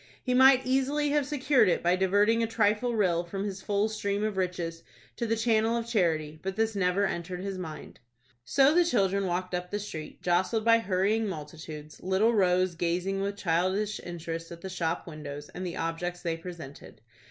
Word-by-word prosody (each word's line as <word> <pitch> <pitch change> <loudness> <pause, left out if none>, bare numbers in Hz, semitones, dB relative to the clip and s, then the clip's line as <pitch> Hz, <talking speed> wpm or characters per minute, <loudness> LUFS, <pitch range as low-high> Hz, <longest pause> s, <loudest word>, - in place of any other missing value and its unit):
He 250 - 0
might 260 0 +6
easily 270 +3 +1
have 290 -2 +1
secured 265 -7 +3
it - - 0
by 175 +1 +3
diverting 205 +5 +3
a 230 - +1
trifling 225 +2 +1
rill, 175 -5 +2
from 195 +3 -5
his 195 -2 -4
full 205 +1 +1
stream 205 -1 -2
of 215 -2 -1
riches, 175 -3 -2 0.4
to 235 - -2
the 225 - +1
channel 225 0 +2
of 230 - -3
charity; 160 -9 0
but 190 0 -4
this 225 +1 +1
never 195 +1 +2
entered 180 0 -4
his 195 -1 -4
mind. 155 -5 -8 0.4
So 275 - +4
the 350 +1 +5
children 200 - +1
walked 180 +1 -2
up 180 0 -3
the 205 - -2
street, 160 -7 -7
jostled 185 +5 +1
by 230 0 +6
hurrying 210 +2 +1
multitudes, 155 -2 -8
little 190 +5 +2
Rose 185 -3 +3
gazing 175 +3 -1
with 200 +1 -2
childish 190 +4 0
interest 165 -1 -6
at 170 0 -9
the 190 - -6
shop 170 -2 -2
windows, 145 -3 -8
and 185 - -7
the 175 -2 -4
objects 175 +2 -3
they 165 -2 -1
presented. 165 -5 -10
190 Hz, 185 wpm, -28 LUFS, 170-220 Hz, 0.4 s, might